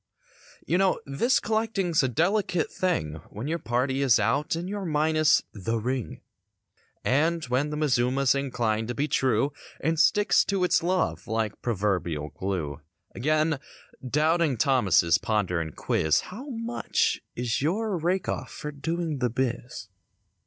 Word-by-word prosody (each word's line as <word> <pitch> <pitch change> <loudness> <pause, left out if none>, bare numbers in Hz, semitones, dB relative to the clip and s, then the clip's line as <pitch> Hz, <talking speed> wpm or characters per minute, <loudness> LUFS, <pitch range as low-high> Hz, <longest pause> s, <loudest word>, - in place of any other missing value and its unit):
You 175 +4 +1
know 195 -1 +2
this 185 - +2
collecting's 215 -6 0
a 130 - +1
delicate 175 - 0
thing 80 - -1
When 110 +7 -6
your 165 +2 -1
party 130 +3 0
is 130 -5 +4
out 135 +10 +1
and 170 +2 -4
your 200 0 -4
minus 155 -1 +3
"the 110 +3 -2
ring;" 125 +2 -3 0.8
And, 160 +5 +2
when 130 +4 0
the 150 - -4
mazuma's 130 -2 +2
inclined 115 -5 -1
to 120 - -4
be 145 +2 0
true 135 0 +1 0.3
And 160 +2 0
sticks 205 +3 +4
to 195 -2 0
its 180 - +3
love 165 - -1
like 110 -1 -2
proverbial 90 -9 -1
glue. 85 -7 -4 0.3
Again, 155 +3 +1 0.4
doubting 155 +1 +2
Thomases 100 - +3
ponder 100 -6 0
and 80 -2 -6
quiz— 80 0 +1
"How 250 +10 -9
much 235 -1 -1
is 120 0 -1
your 200 +7 0
rake 175 +3 0
off 130 - -3
for 150 - -6
doing 160 +1 -3
the 125 -1 +1
biz?" 120 -3 -3
140 Hz, 145 wpm, -26 LUFS, 115-170 Hz, 0.8 s, is